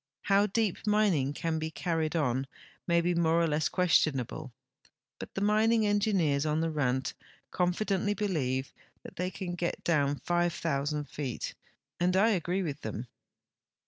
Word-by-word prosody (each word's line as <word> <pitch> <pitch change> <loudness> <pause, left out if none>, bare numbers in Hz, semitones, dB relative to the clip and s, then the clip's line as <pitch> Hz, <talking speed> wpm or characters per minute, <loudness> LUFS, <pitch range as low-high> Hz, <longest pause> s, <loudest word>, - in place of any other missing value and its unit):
How 200 +1 +4
deep 215 0 -1
mining 200 -10 +3
can 160 +1 -2
be 160 0 -3
carried 160 -1 -1
on 135 -4 0 0.4
may 170 -1 +3
be 175 +1 +1
more 165 -1 +3
or 170 - +3
less 155 -1 +1
questionable, 150 -7 +1 0.7
but - - -9
the 195 - -2
mining 215 +2 +3
engineers 200 -9 +2
on 155 0 0
the 165 0 0
Rand 130 -3 0 0.4
confidently 195 +3 0
believe 135 -11 -1 0.3
that - - -11
they 180 +1 -1
can 185 -1 -5
get 175 0 -3
down 145 -4 +2
5,000 155 -4 -1
feet, 135 -5 -4 0.5
and 180 +1 +2
I 215 +4 +5
agree 185 0 0
with 150 -3 -4
them. 110 +3 -5
170 Hz, 145 wpm, -30 LUFS, 145-190 Hz, 0.7 s, I